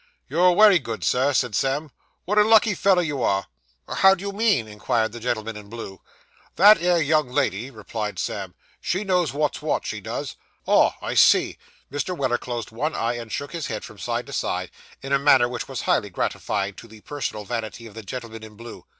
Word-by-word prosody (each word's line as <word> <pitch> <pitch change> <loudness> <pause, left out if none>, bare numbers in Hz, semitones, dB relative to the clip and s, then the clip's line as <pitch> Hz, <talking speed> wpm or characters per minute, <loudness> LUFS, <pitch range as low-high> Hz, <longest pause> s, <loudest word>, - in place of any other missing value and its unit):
'You're 180 +1 +4
wery 205 -1 +6
good, 115 -5 -6
sir,' 130 +3 +2
said 125 -5 0
Sam. 135 +7 -1 0.3
'What 210 +3 +2
a - - +7
lucky 220 0 +5
feller 190 -1 +3
you 145 -5 -3
are!' 100 -4 +1 0.4
'How 190 0 +5
do 190 - -10
you 200 - -3
mean?' 205 - +1
inquired 110 +1 -1
the 120 - -8
gentleman 115 -2 -3
in 105 -1 -11
blue. 105 -5 -8 0.5
'That 205 +1 +7
'ere 175 0 +3
young 155 -2 +2
lady,' 120 0 -1
replied 110 -2 -5
Sam. - - -4 0.3
'She 185 +4 -1
knows 180 -5 +1
wot's 150 +1 -1
wot, - - -1
she - - -4
does. - - -5 0.3
Ah! - - +4
I - - -3
see.' - - +4 0.3
Mr. 160 +6 -3
Weller 130 -3 0
closed 120 -3 -5
one 150 +8 -2
eye, 115 +1 0
and 115 -2 -7
shook 145 +1 -4
his 165 -3 -4
head - - -5
from - - -13
side - - -3
to - - -10
side, - - -2 0.3
in 135 +1 -3
a 140 - +4
manner 135 -3 +5
which 120 -1 -5
was - - -5
highly - - +1
gratifying 100 -1 -2
to 120 - -11
the 110 -1 -15
personal 120 -7 -5
vanity 115 0 -5
of 110 - -11
the 110 - -8
gentleman 115 +1 -7
in 110 -1 -12
blue. 115 +2 -11
125 Hz, 205 wpm, -23 LUFS, 110-170 Hz, 0.5 s, a